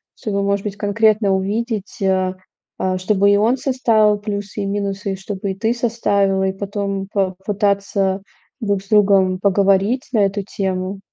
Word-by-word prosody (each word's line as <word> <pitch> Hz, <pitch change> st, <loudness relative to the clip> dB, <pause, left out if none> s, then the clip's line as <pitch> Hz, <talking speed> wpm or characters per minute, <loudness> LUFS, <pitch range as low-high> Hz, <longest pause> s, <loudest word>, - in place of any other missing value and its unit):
чтобы, 200 Hz, -2 st, -2 dB
может 200 Hz, 0 st, 0 dB
быть, 205 Hz, -1 st, -5 dB
конкретно 210 Hz, 0 st, +2 dB
увидеть, 205 Hz, +1 st, -3 dB
э. 185 Hz, -1 st, +1 dB, 0.5 s
Э, 185 Hz, 0 st, 0 dB
чтобы 200 Hz, +1 st, +2 dB
и 200 Hz, -, +5 dB
он 225 Hz, +5 st, +2 dB
составил 225 Hz, -6 st, +2 dB
плюсы 205 Hz, -1 st, -4 dB
и -, -, -2 dB
минусы, 200 Hz, 0 st, -2 dB
и -, -, -3 dB
чтобы 195 Hz, 0 st, -4 dB
и -, -, -5 dB
ты 225 Hz, +4 st, 0 dB
составила. 205 Hz, -5 st, +1 dB
И 190 Hz, -, -1 dB
потом 200 Hz, 0 st, -3 dB
попытаться 195 Hz, 0 st, 0 dB, 0.4 s
друг 200 Hz, -3 st, 0 dB
с 195 Hz, -, -21 dB
другом 195 Hz, -3 st, +4 dB
поговорить 200 Hz, +5 st, +2 dB
на 225 Hz, -, +3 dB
эту 200 Hz, 0 st, +1 dB
тему? 190 Hz, 0 st, -3 dB
200 Hz, 155 wpm, -19 LUFS, 195-210 Hz, 0.5 s, и